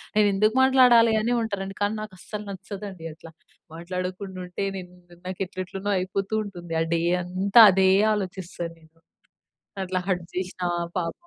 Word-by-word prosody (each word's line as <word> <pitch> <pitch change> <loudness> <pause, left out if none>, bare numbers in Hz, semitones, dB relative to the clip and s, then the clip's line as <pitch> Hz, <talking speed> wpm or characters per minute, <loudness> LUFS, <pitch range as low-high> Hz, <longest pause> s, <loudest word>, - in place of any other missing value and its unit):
నేను 210 -1 +5
ఎందుకు 215 +4 +2
మాట్లాడాలి? 250 -4 +6
అని 240 +2 0
ఉంటారండి. 195 -3 -4
కానీ 205 +2 +1
నాకు 215 -3 -8
అస్సలు 210 +2 -7
నచ్చదండి 195 -3 -7
అట్లా. 160 +1 -14 0.4
మాట్లాడకుండా 185 +2 -5
ఉంటే. 180 +2 -4
నేను 180 -1 -9 0.4
నాకు 185 0 -5
ఎట్ల 185 - -26
ఎట్లనో 195 +2 -4
అయిపోతూ 195 +3 -3
ఉంటుంది. 175 -4 -8
ఆ - - +3
డే 165 - 0 0.2
అంతా 190 +5 +4
అదే 190 0 +4 0.2
ఆలోచిస్తాను 185 -4 -5
నేను. 160 +1 -24 0.9
అట్లా 185 0 -1
హర్ట్ 175 -2 -1
చేసినా 185 0 -3 0.3
పాపం 165 -1 -2
190 Hz, 150 wpm, -25 LUFS, 180-205 Hz, 0.9 s, మాట్లాడాలి